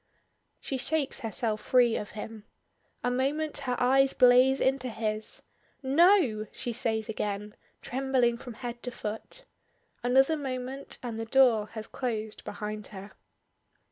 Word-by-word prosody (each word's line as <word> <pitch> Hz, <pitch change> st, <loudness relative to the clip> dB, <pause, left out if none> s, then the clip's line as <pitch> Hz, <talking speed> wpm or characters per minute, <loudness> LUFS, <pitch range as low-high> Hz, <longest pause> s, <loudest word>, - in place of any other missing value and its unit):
_" -, -, -46 dB, 0.6 s
She 270 Hz, -, -3 dB
shakes 290 Hz, +2 st, -1 dB
herself 220 Hz, -1 st, -2 dB
free 245 Hz, -3 st, +4 dB
of 210 Hz, +1 st, -5 dB
him. 215 Hz, 0 st, -7 dB, 0.6 s
A 245 Hz, -, +1 dB
moment 285 Hz, +5 st, 0 dB
her 250 Hz, -, +1 dB
eyes 270 Hz, +2 st, +3 dB
blaze 255 Hz, +2 st, +6 dB
into 265 Hz, -1 st, +1 dB
his. 215 Hz, -1 st, -3 dB, 0.4 s
"No!" 275 Hz, -, +4 dB
she 240 Hz, -, -4 dB
says 220 Hz, -1 st, -1 dB
again, 210 Hz, -1 st, -3 dB, 0.3 s
trembling 255 Hz, -2 st, +1 dB
from 245 Hz, -1 st, -9 dB
head 240 Hz, 0 st, -6 dB
to 250 Hz, -, -4 dB
foot. 225 Hz, -, -6 dB, 0.6 s
Another 265 Hz, +6 st, +4 dB
moment, 265 Hz, -1 st, -4 dB
and 230 Hz, -2 st, -4 dB
the 225 Hz, -, -3 dB
door 235 Hz, -3 st, +4 dB
has 220 Hz, -1 st, -5 dB
closed 220 Hz, -4 st, -4 dB
behind 210 Hz, 0 st, -5 dB
her. 200 Hz, 0 st, -10 dB
245 Hz, 140 wpm, -29 LUFS, 220-265 Hz, 0.6 s, blaze